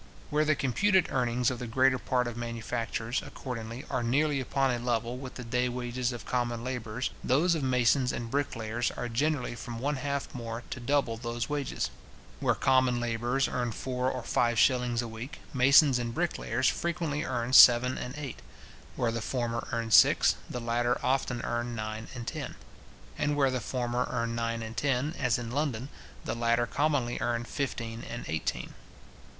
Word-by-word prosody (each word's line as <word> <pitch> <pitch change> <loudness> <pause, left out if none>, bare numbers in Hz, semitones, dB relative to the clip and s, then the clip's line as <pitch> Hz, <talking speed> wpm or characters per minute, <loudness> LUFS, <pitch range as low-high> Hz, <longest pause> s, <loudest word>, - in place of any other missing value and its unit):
Where 150 +1 +2
the 155 0 +3
computed 185 - +2
earnings 125 -2 +1
of 125 - -5
the 125 - -5
greater 130 +2 +3
part 125 -1 0
of 120 -1 -4
manufacturers, 115 0 -3
accordingly, 120 +1 -6
are 130 -2 -1
nearly 140 +4 +2
upon 135 0 +1
a 120 - -1
level 120 0 -1
with 130 -1 -8
the 125 - -6
day 125 +2 0
wages 125 0 -2
of 120 - -7
common 120 -2 -1
labourers, 125 -1 -3
those 160 +8 +3
of 160 - -1
masons 125 0 +3
and 115 -1 -5
bricklayers 120 -4 -1
are 120 - -4
generally 130 +2 0
from 120 0 -7
one 140 +4 -1
half 140 +1 -3
more 115 -1 -5
to - - -4
double 120 -2 +1
those 120 0 -3
wages. 145 -1 -2 0.5
Where - - +2
common 130 -2 +3
labourers 120 +3 0
earn 120 -2 -2
four 125 +2 -1
or 130 - -4
five 120 -1 +1
shillings 125 -1 +3
a - - -5
week, 115 +7 -7 0.2
masons 135 0 +6
and 115 -1 -3
bricklayers 130 -7 0
frequently 155 +2 -1
earn 125 -3 -2
seven 125 0 +8
and 125 +3 -6
eight; 145 -4 -6 0.6
where 120 -2 0
the 115 0 -3
former 115 -1 -2
earn 115 -2 -2
six, - - +6 0.2
the 125 - -4
latter 120 +1 +1
often 125 -2 0
earn 120 0 -2
nine 110 0 -5
and 120 -1 -6
ten; - - -5 0.6
and 145 0 +1
where 135 -2 +3
the 130 -1 -2
former 125 +1 -1
earn 115 0 -1
nine 115 0 -2
and 110 +1 -7
ten, 140 +3 0
as 125 -3 +2
in 120 -1 -5
London, 135 -2 -1 0.4
the - - -1
latter 115 0 +2
commonly 135 -2 0
earn 120 -1 -1
fifteen 115 -3 -4
and 120 - -6
eighteen. 80 +1 -3
125 Hz, 175 wpm, -29 LUFS, 115-135 Hz, 0.6 s, seven